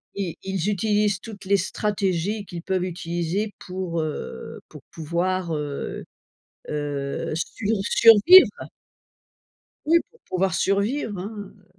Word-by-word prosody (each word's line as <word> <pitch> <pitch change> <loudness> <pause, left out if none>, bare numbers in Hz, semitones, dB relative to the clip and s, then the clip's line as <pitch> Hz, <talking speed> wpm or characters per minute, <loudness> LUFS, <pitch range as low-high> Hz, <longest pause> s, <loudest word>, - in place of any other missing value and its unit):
i 190 -5 -3
ils 195 0 -1
utilisent 210 0 +1
toutes 210 -3 -10
les 200 +1 +3
stratégies 200 0 -1
qu'ils 175 -3 -7
peuvent 185 0 -1
utiliser 175 +3 -2
pour, 180 -3 -3
heu, 150 - -6
pour - - -12
pouvoir, 170 +2 -2
heu, 145 -1 -4 0.7
heu, 145 -1 -3
sui 205 +5 -3
survivre 230 - +8 1.4
oui 335 +2 +6
pour 470 - -24
pouvoir 185 0 -1
survivre, 205 +2 0
hein, 205 +1 -7
heu - - -26
190 Hz, 115 wpm, -24 LUFS, 170-205 Hz, 1.4 s, survivre